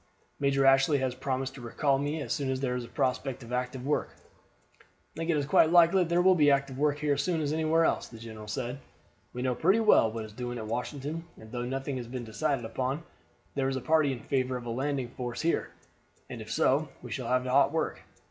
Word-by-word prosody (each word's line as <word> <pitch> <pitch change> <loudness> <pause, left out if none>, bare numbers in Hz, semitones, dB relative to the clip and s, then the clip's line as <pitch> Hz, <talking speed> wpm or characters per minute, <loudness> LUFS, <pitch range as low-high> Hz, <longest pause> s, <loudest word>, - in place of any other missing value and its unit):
Major 140 -1 +2
Ashley 135 +2 +5
has 130 -2 -1
promised 130 0 -3
to 135 - -10
recall 135 +3 +1
me 145 +2 -2
as 120 -2 -2
soon 135 +1 -2
as 130 0 -1
there 130 -2 -1
is 125 - -3
a - - -9
prospect 130 +1 -2
of 120 +1 -8
active 125 +1 -2
work." 150 - 0 0.7
"I - - -22 0.3
think 165 +1 -4
it 160 - +3
is 145 - 0
quite 155 +2 +5
likely 175 +2 +6
that 170 - 0
there 175 +1 +3
will 185 0 +7
be 150 -5 +4
active 140 -1 +1
work 150 0 +2
here 150 -1 +1
as - - 0
soon 175 -3 0
as 150 -1 -1
anywhere 160 +1 +2
else," - - 0
the 115 - -12
general 110 -1 -9
said. 125 +4 -4 0.5
"We 125 - -5
know 130 -1 +1
pretty 190 - +3
well 210 - +5
what 110 -1 -5
is 105 - -12
doing 120 +1 -5
at 110 - -5
Washington, 145 +8 -4
and 110 0 -13
though 120 -1 -3
nothing 135 +1 -3
has 120 -2 -6
been 125 0 -5
decided 120 +3 -1
upon, 130 +7 -2 0.5
there 135 -1 0
is 135 - -2
a - - -1
party 150 +2 +3
in 125 -3 -5
favor 130 -1 -1
of 120 - -9
a 120 - -3
landing 135 +2 -1
in 120 - -13
force 120 -2 -4
here; 165 +1 0 0.6
and - - -6
if - - -8
so, - - +2
we - - -8
shall - - -3
have 125 0 +2
hot 135 +2 +4
work. 160 0 -2
135 Hz, 245 wpm, -29 LUFS, 125-150 Hz, 0.7 s, will